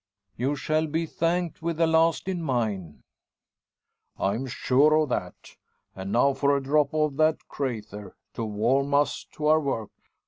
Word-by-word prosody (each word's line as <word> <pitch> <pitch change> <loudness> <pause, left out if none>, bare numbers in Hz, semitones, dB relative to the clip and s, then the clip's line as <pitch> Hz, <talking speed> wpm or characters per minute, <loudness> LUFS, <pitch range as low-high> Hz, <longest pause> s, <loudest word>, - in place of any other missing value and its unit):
"You 135 +5 -1
shall 155 +2 0
be 160 +2 -1
thanked 170 +1 -1
with 165 -1 -2
the 165 - +3
last 160 +2 +2
in 185 -2 -2
mine." 110 - -2 1.1
"I'm 115 +7 -1
sure 140 +5 +3
of 155 -2 +2
that. - - -5 0.4
And 95 +1 -6
now 135 +5 +3
for 140 +1 +2
a 140 - -4
drop 145 +1 +2
of 150 -3 0
the 155 0 +4
`crayther,' 105 -7 -5 0.2
to 115 - -4
warm 125 +7 +1
us 145 +1 +1
to 150 - -5
our 155 +1 +5
work. 135 -8 -3
140 Hz, 160 wpm, -26 LUFS, 120-155 Hz, 1.1 s, our